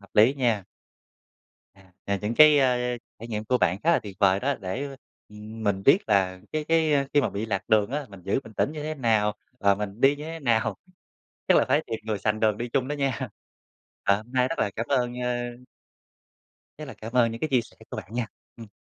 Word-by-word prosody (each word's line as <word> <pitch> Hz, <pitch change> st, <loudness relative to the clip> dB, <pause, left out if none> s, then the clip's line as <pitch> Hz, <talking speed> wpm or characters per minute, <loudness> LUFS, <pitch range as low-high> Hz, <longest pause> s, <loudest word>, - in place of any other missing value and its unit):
Hợp 100 Hz, -, -18 dB
lý 110 Hz, +6 st, +6 dB
nha. 115 Hz, -8 st, 0 dB, 1.1 s
À, 95 Hz, -2 st, -22 dB
à, 100 Hz, -, 0 dB
những 105 Hz, +3 st, -1 dB
cái, 155 Hz, +2 st, +8 dB
a, 125 Hz, -2 st, +1 dB, 0.2 s
trải 115 Hz, +2 st, -9 dB
nghiệm 105 Hz, -1 st, -3 dB
của 125 Hz, +3 st, +1 dB
bạn 90 Hz, -2 st, +2 dB
khá 165 Hz, -, +5 dB
là -, -, +4 dB
tuyệt 100 Hz, -3 st, -9 dB
vời 100 Hz, -1 st, +4 dB
đó 140 Hz, +4 st, 0 dB
để 135 Hz, +9 st, -4 dB, 0.3 s
mình 105 Hz, -2 st, -4 dB
biết 140 Hz, -, +6 dB
là 95 Hz, -3 st, +1 dB
cái 155 Hz, -1 st, -1 dB
cái, 160 Hz, -1 st, +2 dB
a, 140 Hz, -1 st, +2 dB
khi 145 Hz, -, +6 dB
mà -, -, -1 dB
bị 105 Hz, +3 st, -3 dB
lạc 95 Hz, -3 st, -3 dB
đường 105 Hz, 0 st, +3 dB
á. 145 Hz, +1 st, -3 dB
Mình 100 Hz, -2 st, -13 dB
giữ 100 Hz, +8 st, 0 dB
bình 110 Hz, -, -12 dB
tĩnh 140 Hz, -, 0 dB
như 155 Hz, -1 st, -6 dB
thế 155 Hz, +1 st, -3 dB
nào? 110 Hz, -6 st, +1 dB, 0.2 s
Và 100 Hz, -3 st, +4 dB
mình 105 Hz, +2 st, -6 dB
đi 140 Hz, +2 st, +5 dB
như 150 Hz, -, -8 dB
thế 165 Hz, +1 st, -6 dB
nào? 115 Hz, -5 st, +1 dB, 0.7 s
Chắc -, -, +6 dB
là -, -, +4 dB
phải -, -, +3 dB
tìm 115 Hz, -, -3 dB
người 110 Hz, -1 st, -2 dB
sành 105 Hz, +2 st, -1 dB
đường 110 Hz, -2 st, +2 dB
đi 120 Hz, +2 st, -3 dB
chung 130 Hz, +2 st, 0 dB
đó 145 Hz, -, -2 dB
nha. 135 Hz, -3 st, -2 dB, 0.7 s
À, 100 Hz, -, +4 dB
hôm 110 Hz, +3 st, -12 dB
nay 125 Hz, -1 st, +3 dB
rất 165 Hz, -, -4 dB
là 100 Hz, -, +1 dB
cảm 115 Hz, -, -2 dB
ơn 125 Hz, -2 st, 0 dB
ơ 125 Hz, 0 st, -1 dB, 1.4 s
rất 155 Hz, -, -6 dB
là 135 Hz, -, -9 dB
cảm 110 Hz, +1 st, -9 dB
ơn 120 Hz, -2 st, +3 dB
những 115 Hz, -, -7 dB
cái 155 Hz, -, -1 dB
chia 130 Hz, -2 st, +4 dB
sẻ 115 Hz, -, -14 dB
của -, -, -5 dB
bạn 110 Hz, -, -8 dB
nha. 120 Hz, -1 st, -1 dB, 0.3 s
Ừm. 115 Hz, -3 st, -11 dB
115 Hz, 235 wpm, -26 LUFS, 105-135 Hz, 1.4 s, cái